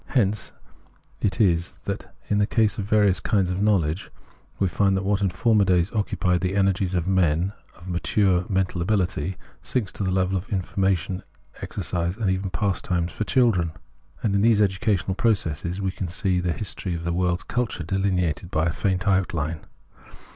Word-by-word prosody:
Hence 105 -5 0 0.7
it 100 +2 -1
is 85 -5 +2
that, - - -4 0.2
in 105 - +1
the 105 - +3
case 110 -3 +1
of 100 - -2
various 105 -2 +3
kinds 95 -4 +1
of 90 +2 -2
knowledge, 95 -5 +1 0.5
we 95 - +2
find 95 +4 +2
that 95 - -1
what 100 +1 +1
in 100 - +2
former 110 +3 +3
days 90 0 +2
occupied 90 -4 0
the 95 +1 -1
energies 95 -1 +1
of 90 0 0
men 90 0 +2 0.2
of 90 - -14
mature 90 +1 +2
mental 95 -2 0
ability 90 -3 0 0.2
sinks 110 -7 -1
to - - -4
the 95 - 0
level 95 0 +1
of 95 - -13
information, 95 -1 0 0.4
exercises, 85 +2 -2
and 105 -5 +1
even 95 +1 -1
pastimes 90 -2 -1
for 110 - -3
children; 100 -12 +2 0.5
and 105 - +1
in 100 - +2
this 110 -1 +4
educational 100 -1 +1
progress 95 -8 0 0.2
we 95 -1 -1
can 95 -1 -4
see 90 +1 0
the 90 -1 0
history 95 -1 -3
of 85 - -5
the 85 0 -1
world's 90 0 0
culture 120 -8 -2
deUneated 90 -1 -1
in 80 +2 +2
faint 95 +1 0
outhne. 90 -5 0
95 Hz, 170 wpm, -24 LUFS, 90-100 Hz, 0.7 s, this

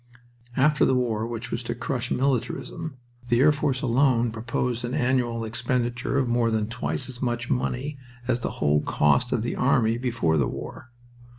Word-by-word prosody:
After 150 +3 +4
the 130 - +4
war 115 -3 0
which 120 +1 -5
was 115 - -2
to 120 -1 -4
crush 125 0 -3
militarism 130 +2 -1 0.3
the 120 0 +3
air 145 +3 +6
force 140 -2 -1
alone 120 -2 +3
proposed 120 +2 -2
an 120 +2 -2
annual 125 -4 +1
expenditure 120 +2 -1
of 135 -3 +2
more 120 -1 +2
than 110 -1 +1
twice 80 -9 -2
as 130 -2 -6
much 120 0 -1
money 135 +2 -1 0.3
as 125 -1 +1
the - - -2
whole 75 0 +2
cost 100 +16 +2
of 110 - +1
the 120 - -2
army 120 -3 +2
before 115 -11 +1
the 70 - +2
war. 130 - -7
120 Hz, 175 wpm, -25 LUFS, 115-130 Hz, 0.3 s, air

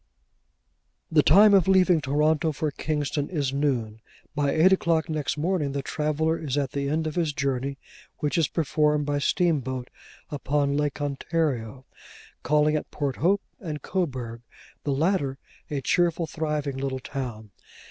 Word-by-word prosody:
The 155 -2 +6
time 200 +8 +7
of 190 -3 +5
leaving 185 -3 +4
Toronto 150 +3 +2
for 150 +1 -2
Kingston 145 0 -2
is 145 -6 -1
noon. 120 -7 -1 0.3
By 145 -1 +1
eight 170 +6 +5
o'clock 165 -3 +1
next 155 -1 -2
morning, 155 -3 0
the 140 -1 -2
traveller 155 +3 0
is 145 -3 -3
at 140 -2 0
the 140 0 -2
end 160 +2 0
of 155 - -2
his 165 -3 0
journey, 135 -1 -2 0.4
which 150 +1 -1
is 165 -4 +3
performed 150 -1 +1
by 145 0 0
steamboat 135 -6 0 0.4
upon 140 0 0
Lake 145 -1 -1
Ontario, 140 -4 -2 0.6
calling 150 +1 +2
at 150 - -3
Port 140 -3 -3
Hope 195 +5 +2 0.2
and 155 -5 -6
Coburg, 130 -11 -3 0.4
the 145 - 0
latter 140 -2 +1 0.3
a 145 -2 -2
cheerful, 170 +3 +1
thriving 150 -3 -3
little 135 -1 -2
town. 120 -6 -6
150 Hz, 145 wpm, -26 LUFS, 140-160 Hz, 0.6 s, time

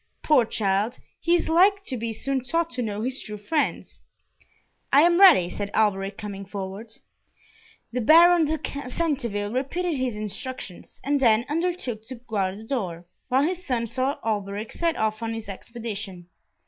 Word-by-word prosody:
Poor 280 -6 +4
child, 210 +2 0 0.2
he 340 +1 +3
is 345 - 0
like 390 +5 +4
to 265 - -3
be 230 -1 -3
soon 265 +3 -2
taught 335 +6 0
to 250 - -3
know 210 -2 -3
his 260 +2 -2
true 210 -1 -6
friends." 295 +10 -2 0.9
"I 280 +3 +7
am 345 +1 +4
ready," 320 - +8
said 200 +3 -4
Alberic, 200 -2 +1
coming 200 -2 -6
forward. 200 +3 -7 1.0
The 250 - 0
Baron 335 +6 +7
de 285 -3 -3
Centeville 240 -9 -1
repeated 315 +6 -1
his 255 -3 -1
instructions, 215 -1 -5
and 285 +1 +1
then 230 -2 +4
undertook 315 -8 -2
to 260 - -6
guard 205 -5 -2
the 215 - -10
door, 185 -9 -3 0.2
while 260 +2 +3
his 360 +3 -1
son 245 -7 -1
saw 260 +5 -1
Alberic 205 0 -2
set 335 -1 0
off 215 0 -1
on 225 0 -2
his 225 -2 -7
expedition. 200 -3 -6
235 Hz, 160 wpm, -25 LUFS, 210-290 Hz, 1.0 s, ready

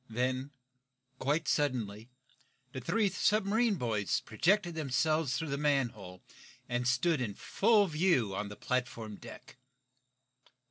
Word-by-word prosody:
Then, 130 +4 -1 0.7
quite 150 +4 0
suddenly, 120 -6 -1 0.6
the 130 - -6
three 210 - +1
submarine 210 +3 +2
boys 110 - 0
projected 175 - +1
themselves 155 -2 0
through 160 +3 -4
the 140 0 -2
manhole, 120 -11 -1 0.4
and 120 0 -1
stood 135 +4 +2
in 105 -5 -3
full 210 - +3
view 155 - +1
on 100 +1 -3
the 105 - -8
platform 115 -4 -3
deck. - - -12
130 Hz, 120 wpm, -32 LUFS, 115-165 Hz, 0.7 s, full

